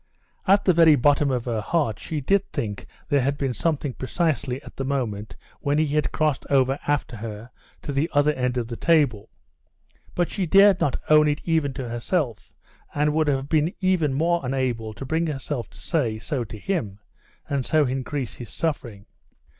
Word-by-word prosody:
At 195 +2 +4
the 185 - +5
very 165 -2 +6
bottom 145 +2 +3
of 125 -3 -1
her 115 -3 -1
heart 125 -4 0
she 155 -2 -4
did 195 +7 +1
think 105 -3 -4 0.2
there 145 -2 +2
had 140 +3 0
been 135 -3 -1
something 150 -2 -1
precisely 135 -2 -1
at - - -12
the 135 - -3
moment 120 -7 -3 0.2
when 145 -1 0
he 155 - +3
had 150 -1 +1
crossed 155 -3 0
over 135 0 +2
after 145 -5 -1
her 110 +2 -7 0.3
to - - -4
the 145 +5 0
other 145 +1 +3
end 125 -2 -1
of 120 -2 -1
the 120 - -5
table; 145 -9 +2 0.9
but 175 -1 +1
she 190 -4 -2
dared 195 +1 +6
not 140 - +1
own 150 0 +7
it 150 0 0
even 160 -4 +1
to 130 -2 -5
herself, 120 - -2 0.4
and 150 +1 +2
would 155 0 +1
have 135 -1 0
been 155 +3 +1
even 180 -7 +1
more 170 +3 +1
unable 125 -4 -1
to 120 +5 -8
bring 160 +4 0
herself 135 -5 -4
to - - -18
say 125 -10 -1
so 125 +3 -3
to 110 - -9
him, 110 - -3 0.5
and 140 -2 -1
so 155 +3 +2
increase 130 0 -3
his 120 - -9
suffering. 120 -11 -3
140 Hz, 185 wpm, -24 LUFS, 125-155 Hz, 0.9 s, own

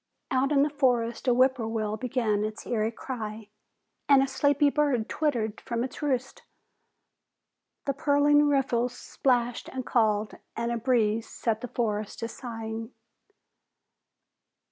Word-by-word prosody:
Out 265 +2 +2
in 280 -1 +5
the 300 - +1
forest 250 -4 +1
a - - +5
whippoorwill 230 -4 +1
began 225 -4 0
its 215 0 -5
eerie 220 -1 0
cry, 220 -3 -6 0.6
and 275 -1 +7
a - - 0
sleepy 285 +1 +2
bird 280 -7 +1
twittered 235 -9 -1
from 235 0 -2
its 260 - -6
roost. 265 -3 -1 1.4
The 275 - 0
purling 290 0 +4
riffles 250 -4 +1
splashed 245 -3 0
and 260 -1 -5
called 215 -3 +1 0.2
and 235 +1 -2
a 235 - 0
breeze 230 -2 +1
set 225 -2 -2
the 250 - -4
forest 215 -4 -2
to 230 - -1
sighing. 225 -1 -6
240 Hz, 130 wpm, -27 LUFS, 225-270 Hz, 1.4 s, and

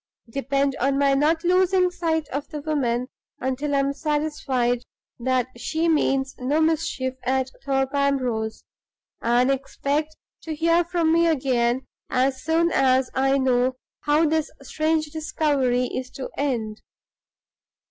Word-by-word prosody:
Depend 275 +1 0
on 275 +2 +1
my 280 -1 +3
not 310 +4 +2
losing 365 0 +3
sight 320 -4 -1
of 280 +2 -4
the 300 - -6
woman 255 -5 -1 0.3
until 275 +3 -1
I - - +3
am 275 0 0
satisfied 295 -5 -1 0.4
that 255 0 +1
she 320 +7 -1
means 270 -4 +1
no 270 +5 +1
mischief 315 -5 0
at 260 0 0
Thorpe 270 0 0
Ambrose; 255 -6 0 0.6
and 245 +3 +3
expect 285 +3 -2 0.3
to 320 -1 -5
hear 335 +2 +3
from 335 -2 +1
me 335 0 +4
again 255 -4 +1 0.2
as 260 +1 +1
soon 330 +1 +2
as 260 -2 +3
I 270 +1 +2
know 255 -1 +2 0.2
how 300 +2 +2
this 315 0 +1
strange 310 +2 0
discovery 290 -5 0
is 255 0 -4
to 265 - -6
end. 230 -7 -2
275 Hz, 135 wpm, -24 LUFS, 260-315 Hz, 0.6 s, me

